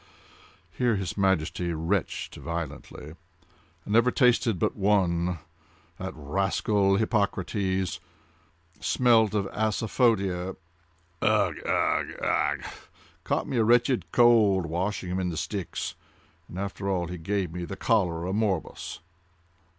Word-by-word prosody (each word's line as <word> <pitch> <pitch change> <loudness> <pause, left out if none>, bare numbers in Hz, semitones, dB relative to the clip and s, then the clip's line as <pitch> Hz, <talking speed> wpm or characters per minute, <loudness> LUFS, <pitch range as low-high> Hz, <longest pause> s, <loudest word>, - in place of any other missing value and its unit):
(Here 120 -3 +2
his 95 -4 -3
Majesty 90 -3 0
retched 85 +4 -2
violently.) 80 -2 -6 0.7
"I - - -10
never 115 +3 +5
tasted 125 -5 +3
but - - 0
one—that 85 -2 -2
rascal 95 +5 +1
Hippocrates!—smelt 95 0 -1
of 100 -2 +1
asafoetida—ugh! 105 -4 +1 0.7
ugh! - - +1 0.5
ugh!—caught - - -3
a 115 -3 +3
wretched 120 - +2
cold 110 -6 +5
washing 90 +3 -2
him 95 - -1
in 90 -1 -1
the 80 - -4
Styx—and 85 -2 -7
after 100 0 -3
all 90 -3 0
he 90 0 -6
gave 95 0 -2
me 90 0 -4
the 95 - -5
cholera 90 -6 +1
morbus." 100 -8 -2
95 Hz, 95 wpm, -27 LUFS, 85-105 Hz, 0.7 s, never